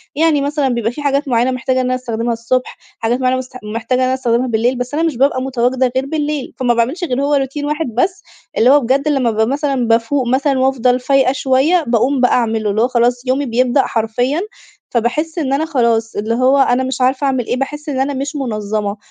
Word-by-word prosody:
يعني 310 Hz, -1 st, +2 dB
مثلًا، 285 Hz, -1 st, 0 dB
بيبقى 235 Hz, -2 st, -1 dB
في 290 Hz, -, -8 dB
حاجات 285 Hz, 0 st, 0 dB
معيّنة 245 Hz, 0 st, +2 dB
محتاجة 255 Hz, +1 st, -1 dB
إن -, -, -2 dB
أنا 255 Hz, 0 st, 0 dB
أستخدمها 235 Hz, -2 st, -2 dB
الصبح، 240 Hz, +2 st, -2 dB, 0.2 s
حاجات 235 Hz, +2 st, 0 dB
معيّنة 255 Hz, 0 st, +1 dB
مست 255 Hz, 0 st, -7 dB
محتاجة 230 Hz, +4 st, -2 dB
إن -, -, +2 dB
أنا 255 Hz, -, +1 dB
استخدمها 250 Hz, -1 st, 0 dB
بالليل، 240 Hz, +2 st, 0 dB
بس 250 Hz, +3 st, -4 dB
أنا 320 Hz, -, 0 dB
مش 320 Hz, -7 st, -1 dB
بابقى 270 Hz, 0 st, +2 dB
متواجدة 255 Hz, 0 st, 0 dB
غير 260 Hz, +1 st, 0 dB
بالليل، 295 Hz, -2 st, -3 dB
فما 245 Hz, -2 st, +2 dB
باعملش 250 Hz, +10 st, -1 dB
غير 265 Hz, -5 st, -1 dB
هو 290 Hz, -, +1 dB
روتين 275 Hz, +1 st, -2 dB
واحد 300 Hz, +2 st, -1 dB
بس، 370 Hz, +10 st, 0 dB, 0.3 s
اللي 240 Hz, -, +4 dB
هو 285 Hz, +2 st, +6 dB
بجد 270 Hz, +5 st, 0 dB
لما 270 Hz, -6 st, +1 dB
بابقى 220 Hz, +1 st, +1 dB
مثلًا 275 Hz, -2 st, -1 dB
بافوق 235 Hz, +3 st, +1 dB
مثلًا 270 Hz, +2 st, +1 dB
وأفضل 255 Hz, -1 st, +2 dB
فايقة 265 Hz, 0 st, +2 dB
شويّة 275 Hz, +6 st, +2 dB
باقوم 250 Hz, +3 st, +1 dB
بقى 250 Hz, -, +3 dB
أعمله، 225 Hz, -3 st, +1 dB
اللي 215 Hz, +2 st, 0 dB
هو 245 Hz, -, +3 dB
خلاص 245 Hz, 0 st, +1 dB
يومي 265 Hz, +3 st, +1 dB
بيبدأ 250 Hz, +2 st, +2 dB
حرفيًا. 245 Hz, +7 st, -1 dB, 0.5 s
فباحس 300 Hz, +8 st, -1 dB
إن 275 Hz, -4 st, -1 dB
أنا 295 Hz, +3 st, +1 dB
خلاص، 235 Hz, -7 st, 0 dB
اللي 215 Hz, +2 st, -1 dB
هو 255 Hz, +3 st, +3 dB
أنا 260 Hz, -1 st, +3 dB
مش 260 Hz, 0 st, -3 dB
عارفة 260 Hz, +2 st, +1 dB
أعمل 260 Hz, -3 st, 0 dB
إيه؟ -, -, 0 dB
باحس 295 Hz, +3 st, -4 dB
إن 265 Hz, -2 st, -2 dB
أنا 275 Hz, +2 st, 0 dB
مش 280 Hz, +3 st, -4 dB
منظمة، 215 Hz, -5 st, -3 dB
255 Hz, 215 wpm, -16 LUFS, 235-280 Hz, 0.5 s, هو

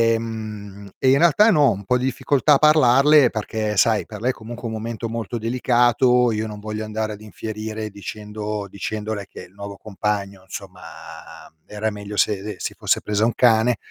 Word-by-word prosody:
ehm, 105 Hz, -3 st, -7 dB
e 130 Hz, -, +2 dB
in 135 Hz, -, +5 dB
realtà 175 Hz, +7 st, +5 dB
no, 150 Hz, -6 st, +5 dB
un 100 Hz, +1 st, -6 dB
po' 125 Hz, +4 st, +2 dB
di 125 Hz, -, -1 dB
difficoltà 140 Hz, +2 st, +2 dB
a -, -, +6 dB
parlarle 150 Hz, -1 st, +5 dB
perché 110 Hz, -1 st, -3 dB
sai, 110 Hz, +1 st, +3 dB
per 105 Hz, -2 st, -8 dB
lei 125 Hz, +4 st, +1 dB
è -, -, -9 dB
comunque 120 Hz, +1 st, -8 dB
un 110 Hz, -, -5 dB
momento 115 Hz, +1 st, -4 dB
molto 115 Hz, 0 st, -4 dB
delicato, 120 Hz, +1 st, +3 dB
io 110 Hz, +1 st, -2 dB
non 105 Hz, -1 st, -8 dB
voglio 110 Hz, +1 st, -5 dB
andare 110 Hz, 0 st, -3 dB
ad 105 Hz, -, -11 dB
infierire 110 Hz, 0 st, -6 dB
dicendo 105 Hz, +1 st, -6 dB
dicendole 105 Hz, +1 st, -4 dB
che -, -, -11 dB
il 90 Hz, +1 st, -17 dB
nuovo 100 Hz, 0 st, -8 dB
compagno, 100 Hz, -1 st, -3 dB
insomma, 95 Hz, -1 st, -9 dB, 0.7 s
mhmm, 80 Hz, 0 st, -45 dB
era 105 Hz, +1 st, -2 dB
meglio 105 Hz, 0 st, -7 dB
se 100 Hz, -2 st, +2 dB
le 105 Hz, 0 st, -6 dB
si -, -, -4 dB
fosse -, -, 0 dB
presa 105 Hz, 0 st, -1 dB
un 115 Hz, -, +1 dB
cane. 115 Hz, -1 st, +4 dB
110 Hz, 190 wpm, -22 LUFS, 105-120 Hz, 0.7 s, a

